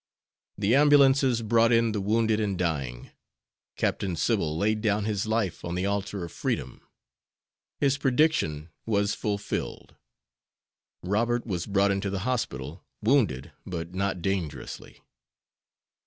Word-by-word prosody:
The 100 +2 +2
ambulances 135 -4 +5
brought 115 +1 +3
in 115 -1 +3
the 105 -2 -2
wounded 110 +2 +2
and 100 -3 -1
dying. 70 -9 -3 0.6
Captain 95 -4 -1
Sybil 80 0 0
laid 105 +4 +1
down 105 -1 +1
his 105 -1 -1
life 110 -5 -1
on 85 0 -3
the 90 +1 -1
altar 100 -2 -2
of 85 - -10
freedom. 60 - -3 1.0
His 140 -1 +1
prediction 130 - +1 0.2
was 100 -2 +1
fulfilled. 105 -1 -4 1.1
Robert 115 +6 0
was 90 -6 -3
brought 100 0 +3
into 100 0 -1
the 95 -1 -3
hospital, 80 - -3 0.2
wounded, 105 - +2
but 85 -1 -6
not 95 -2 -2
dangerously. 85 -8 -4
100 Hz, 125 wpm, -27 LUFS, 90-115 Hz, 1.1 s, ambulances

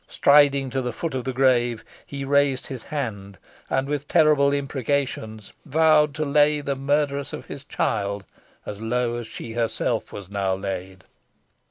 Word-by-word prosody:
Striding 140 -2 +4
to 135 +1 -1
the 125 -2 -3
foot 165 +5 -4
of 130 -2 -3
the 130 - -1
grave 120 -3 +2 0.2
he 140 -1 -5
raised 140 -1 +2
his 130 -4 -6
hand, 100 -9 -5 0.3
and 135 - 0
with 145 0 -3
terrible 150 -4 +4
imprecations 135 -6 -2
vowed 150 0 +3
to 155 - -1
lay 150 +1 +3
the 140 -1 -2
murtheress 140 +1 -1
of - - -6
his 140 - -9
child 100 -6 -2 0.4
as 105 0 -7
low 120 +1 -1
as 120 -1 -6
she 115 0 -7
herself 115 -1 -1
was 100 -3 -8
now 100 -1 -1
laid. 95 -1 -6
135 Hz, 160 wpm, -24 LUFS, 110-145 Hz, 0.4 s, Striding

